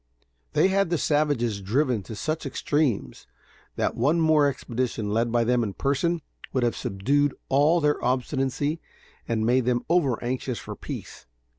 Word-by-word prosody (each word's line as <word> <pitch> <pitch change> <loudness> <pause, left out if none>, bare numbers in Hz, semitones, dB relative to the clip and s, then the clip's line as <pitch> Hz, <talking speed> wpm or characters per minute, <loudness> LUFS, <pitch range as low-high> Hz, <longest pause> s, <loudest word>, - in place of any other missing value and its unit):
They 190 - +4
had 195 -1 +2
the 170 - +1
savages 145 -10 +1
driven 125 +3 +1
to 110 +3 -8
such 155 +6 -3
extremes 140 - -1 0.5
that - - 0
one 145 +8 +2
more 155 -2 +4
expedition, 120 -5 -2
led 115 +1 +1
by 120 0 +3
them 125 +1 +2
in 105 -4 -2
person, 145 +4 0 0.3
would 130 - +1
have 120 - +1
subdued 135 +7 0
all 145 +6 +4
their 150 -2 +1
obstinacy 135 +4 -1 0.5
and 110 -1 0
made 125 +1 +3
them 120 -1 0
over 155 -9 +3
anxious 125 0 -2
for - - -7
peace. - - -8
130 Hz, 155 wpm, -25 LUFS, 120-150 Hz, 0.5 s, They